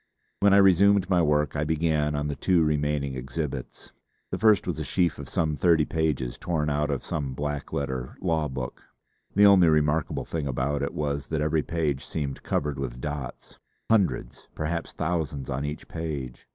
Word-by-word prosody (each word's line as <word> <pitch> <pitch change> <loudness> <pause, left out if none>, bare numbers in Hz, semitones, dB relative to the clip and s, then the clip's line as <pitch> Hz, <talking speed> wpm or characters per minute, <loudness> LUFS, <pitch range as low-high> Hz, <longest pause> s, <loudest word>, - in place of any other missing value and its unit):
When 100 0 +5
I 100 - +6
resumed 100 0 +5
my 90 -2 +4
work 75 -3 +1
I 75 - 0
began 75 -1 +1
on 75 0 -1
the 75 - -3
two 90 0 +2
remaining 75 -2 0
exhibits. 65 +1 -5 0.4
The - - -2
first 110 -4 +4
was - - -3
a - - -2
sheaf 90 -4 0
of - - -7
some 80 -3 0
thirty 80 +1 +3
pages 75 -7 -1
torn 75 -4 -1
out 75 +1 0
of 70 -2 -2
some 70 -4 -3
black 75 0 -4
letter 65 -3 -3
law 80 -4 0
book. 65 -2 -6 0.5
The 100 +1 +7
only 95 -4 +7
remarkable 75 0 +1
thing 80 -3 -3
about 70 +2 -1
it 70 - -3
was 70 -2 -2
that 80 - -2
every 75 +1 +1
page 75 -4 -1
seemed 70 -3 -4
covered 70 -2 -2
with - - -4
dots 75 -2 -6 0.3
hundreds, 95 - +1
perhaps 85 +2 -3
thousands 80 -5 -2
on 70 +3 -2
each 75 +1 -5
page. 70 -7 -5
75 Hz, 180 wpm, -26 LUFS, 70-80 Hz, 0.5 s, The